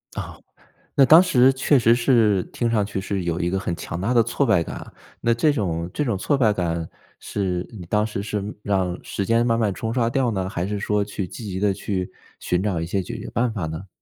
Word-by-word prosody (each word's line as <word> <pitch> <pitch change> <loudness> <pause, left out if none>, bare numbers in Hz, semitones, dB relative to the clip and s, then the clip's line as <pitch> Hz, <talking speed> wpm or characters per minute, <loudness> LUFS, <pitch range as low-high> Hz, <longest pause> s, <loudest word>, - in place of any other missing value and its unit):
哦， - - -5 0.6
那 135 - +6
当 160 +6 +8
时 135 -7 +4
确 135 +1 +3
实 115 0 +5
是 115 -6 +3
听 120 -1 -2
上 110 -3 +2
去 100 -1 -4
是 95 -1 -3
有 85 -1 -1
一 85 0 0
个 95 - 0
很 90 -2 -2
强 85 - -5
大 115 +7 0
的 115 - +6
挫 120 +5 0
败 95 -8 +3
感 - - -7
啊。 - - -10 0.3
那 115 - +2
这 150 +6 +3
种 85 - -2
这 150 - -1
种 115 -6 0
挫 145 +9 0
败 110 -5 +4
感 85 -4 -2 0.3
是 90 -3 -2
你 105 -7 -9
当 105 +3 +1
时 100 -2 -4
是 105 -1 -3 0.2
让 95 -3 0
时 100 - -3
间 115 +2 +2
慢 115 -1 +2
慢 105 -4 +1
冲 115 0 -3
刷 115 -2 +1
掉 125 0 +1
呢， 95 -3 -2
还 90 -2 -3
是 105 0 -2
说 105 0 0
去 100 -2 -4
积 115 - -9
极 95 +1 -4
地 100 -2 +2
去 95 -2 -3 0.3
寻 90 +1 0
找 95 -6 -1
一 85 - -3
些 95 +2 -1
解 - - -6
决 - - -7
办 120 0 0
法 95 -7 -3
呢？ 80 +5 -7
105 Hz, 260 characters per minute, -23 LUFS, 95-115 Hz, 0.6 s, 当